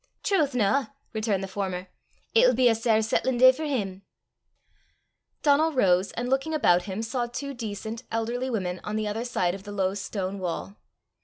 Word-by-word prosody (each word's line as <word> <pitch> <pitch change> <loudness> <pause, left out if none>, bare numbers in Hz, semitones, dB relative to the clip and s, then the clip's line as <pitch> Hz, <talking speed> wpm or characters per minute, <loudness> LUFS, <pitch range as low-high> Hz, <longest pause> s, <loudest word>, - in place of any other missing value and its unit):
"Trowth, 310 - +1
na!" 245 +4 +2 0.3
returned 215 -3 0
the - - -3
former; 190 -2 -4 0.5
"it'll - - +5
be 255 -1 +4
a 235 - +5
sair 225 -1 +2
sattlin 240 +3 0
day 255 +1 +8
for 310 +5 -5
him!" 200 -10 -2 1.4
Donal 310 +2 +4
rose, 190 -7 +3
and 240 +1 -3
looking 270 +5 0
about 180 -11 +3
him, 200 +2 -4
saw 240 +1 -2
two 280 +4 -5
decent, 220 -1 -5
elderly 235 +3 -1
women 185 -6 -2
on 210 - -4
the 215 -1 -1
other 215 +3 -2
side 185 -8 0
of 195 - -7
the 205 +1 -9
low 190 -2 0
stone 195 -1 -4
wall. 185 +2 -4
225 Hz, 175 wpm, -26 LUFS, 195-255 Hz, 1.4 s, day